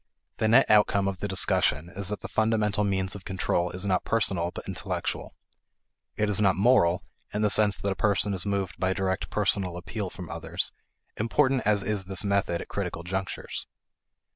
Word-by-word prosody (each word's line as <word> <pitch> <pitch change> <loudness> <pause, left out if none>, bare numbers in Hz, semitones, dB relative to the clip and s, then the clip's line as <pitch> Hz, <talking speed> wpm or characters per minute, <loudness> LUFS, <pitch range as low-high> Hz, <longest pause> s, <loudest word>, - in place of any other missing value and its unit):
The 110 - +1
net 120 +5 +6
outcome 105 -2 +4
of 95 -2 -3
the 105 - -2
discussion 85 -5 +1
is 95 +1 -6
that 105 0 -3
the - - -6
fundamental 110 -2 +1
means 95 -1 0
of 100 - -9
control 90 -2 -1
is 90 +2 -1
not 95 -2 +1
personal 95 -6 +1
but - - -9
intellectual. - - -4 0.8
It 105 - +1
is 105 0 +3
not 95 -2 +4
"moral" 95 -5 +3 0.3
in 105 +1 -1
the 105 - +3
sense 105 -1 +4
that 100 - -2
a - - -2
person 100 0 +2
is 95 - -2
moved 100 -2 -2
by 95 0 +1
direct 95 0 -2
personal 95 -3 0
appeal 95 +3 -5
from 90 -1 -9
others, - - -2 0.5
important 130 +4 +2
as 105 -2 +3
is 100 -1 -1
this 95 +2 +2
method 100 -4 0
at - - -8
critical 85 - -4
junctures. 95 +1 -4
100 Hz, 185 wpm, -27 LUFS, 95-105 Hz, 0.8 s, net